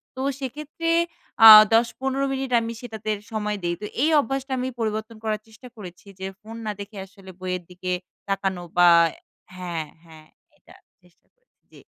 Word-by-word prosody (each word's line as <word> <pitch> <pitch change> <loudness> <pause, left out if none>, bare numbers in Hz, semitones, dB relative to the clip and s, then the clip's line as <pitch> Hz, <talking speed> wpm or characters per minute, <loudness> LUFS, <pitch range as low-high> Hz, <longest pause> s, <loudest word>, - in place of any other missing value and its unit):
তো 260 - -5 0.2
সেক্ষেত্রে 300 +5 -5 0.6
আ - - +13 0.3
১০, 230 +1 +5
১৫ 270 +1 0
মিনিট 265 -1 -4
আমি 230 0 -4
সেটাতে 220 -3 -7 0.2
সময় 210 -1 -2
দেই। 175 0 -1
তো - - -4 0.2
এই 315 - +3
অভ্যাসটা 270 +1 -3
আমি 255 - -2
পরিবর্তন 220 0 -3
করার 215 -1 -2
চেষ্টা 225 +3 -14
করেছি 180 -1 -11
যে 190 - -4
ফোন 220 +1 -10
না 210 - -1
দেখে 200 +1 -9
আসলে 195 -1 -14
বইয়ের 180 -1 -3
দিকে 180 0 -5 0.4
তাকানো 195 -2 -2
বা 175 0 +7 0.7
হ্যাঁ, 175 -3 -4 0.2
হ্যাঁ 160 -2 -16 0.3
এটা - - -19 0.3
চেষ্টা 180 -2 -29
করেছি। - - -50
জ্বি। - - -16
215 Hz, 165 wpm, -24 LUFS, 185-255 Hz, 0.7 s, আ